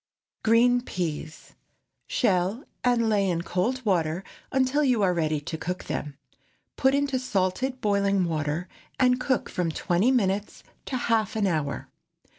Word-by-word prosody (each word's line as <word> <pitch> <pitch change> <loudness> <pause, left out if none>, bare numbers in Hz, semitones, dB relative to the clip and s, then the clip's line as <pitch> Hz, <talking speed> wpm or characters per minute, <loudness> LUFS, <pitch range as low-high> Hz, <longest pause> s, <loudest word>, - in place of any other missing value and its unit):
GREEN 245 +2 +4
PEAS. 160 -7 -5 0.5
Shell 195 +2 +1 0.2
and 240 -2 +3
lay 200 -3 +2
in 170 -1 -1
cold 240 +10 -1
water 175 -3 +1 0.3
until 265 +3 +2
you 250 -6 +3
are 185 -2 +3
ready 155 -3 0
to 160 +1 -5
cook 180 +3 -4
them. 145 -2 -4 0.6
Put 265 +1 +3
into 280 -2 +1
salted 255 +3 -1
boiling 200 -2 +2
water, 155 +1 -2 0.3
and 250 -1 +4
cook 260 -2 0
from 175 -2 -1
twenty 180 +8 +1
minutes 205 -5 0 0.2
to 260 - -1
half 225 -3 0
an 215 -2 +1
hour. 155 -6 -1
200 Hz, 140 wpm, -26 LUFS, 175-250 Hz, 0.6 s, GREEN